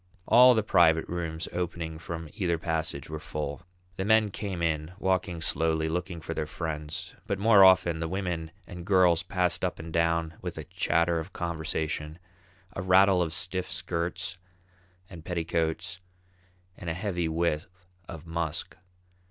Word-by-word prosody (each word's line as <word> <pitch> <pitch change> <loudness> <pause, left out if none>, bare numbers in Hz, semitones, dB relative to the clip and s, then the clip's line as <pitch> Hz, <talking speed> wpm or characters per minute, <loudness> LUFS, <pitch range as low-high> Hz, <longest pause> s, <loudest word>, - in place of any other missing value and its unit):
All 125 +1 +8
the 110 - +2
private 80 -5 +4
rooms 85 -2 -3
opening 85 -2 -3
from 80 -1 -6
either 90 -5 0
passage 80 -4 -2
were 80 0 -5
full; 75 -1 -5 0.4
the 95 - -1
men 110 0 +4
came 95 -4 -4
in, 80 +1 -1
walking 95 -3 0
slowly, 80 0 +1
looking 85 +1 -3
for 80 - -4
their 80 -2 -3
friends; 75 -2 -5
but 100 - -1
more 100 0 +6
often, 90 -3 +5
the 80 - -2
women 90 -3 -3 0.2
and 90 0 -8
girls 90 -3 +4
passed 90 -1 0
up - - -1
and 80 0 -8
down 85 -1 +1
with - - -5
a - - -5
chatter 85 0 +1
of 80 +5 -8
conversation, 80 -2 -3 0.6
a - - -3
rattle 95 0 +5
of 85 -2 0
stiff 90 +1 -1
skirts 85 0 -3 0.7
and 85 -4 -11
petticoats, 85 +1 -2 0.8
and 85 - -6
a 80 - -2
heavy 90 -3 -1
whiff 80 -1 0 0.4
of 80 0 -8
musk. 85 -2 -3
85 Hz, 150 wpm, -28 LUFS, 80-90 Hz, 0.8 s, All